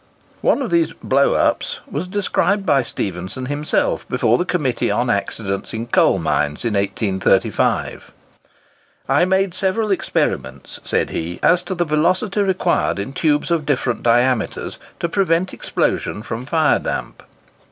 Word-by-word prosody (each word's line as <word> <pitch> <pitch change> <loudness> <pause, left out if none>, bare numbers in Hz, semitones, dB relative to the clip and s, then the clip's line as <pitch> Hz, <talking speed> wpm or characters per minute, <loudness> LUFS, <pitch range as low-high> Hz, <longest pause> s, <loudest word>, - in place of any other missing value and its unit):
One 280 - +2
of 235 - -4
these 165 -1 +2
"blows 140 +1 +2
up" - - +2 0.2
was 155 +6 -4
described 200 +1 0
by 140 -1 +4
Stephenson 95 +1 -4
himself 145 +3 -1
before 120 -2 +2
the 175 - 0
Committee 150 -9 0
on 120 0 +1
Accidents 100 0 -3
in 115 +1 -3
Coal 120 - +3
Mines, 75 0 -1
in 115 - 0
1835: 100 -1 0 1.0
"I 145 +6 +3
made 190 0 +1
several 200 +3 0
experiments," 65 - -2
said - - 0
he, 85 +2 -4
"as 175 0 +4
to 185 +1 -5
the 175 0 0
velocity 185 +7 +1
required 190 - +1
in 100 +7 -4
tubes 150 +2 +1
of 165 -3 0
different 130 -4 0
diameters, 120 -1 +1 0.2
to - - 0
prevent 180 0 +1
explosion 105 - -1
from 120 +2 -5
fire 155 0 +3
damp. - - -4
145 Hz, 140 wpm, -20 LUFS, 110-180 Hz, 1.0 s, by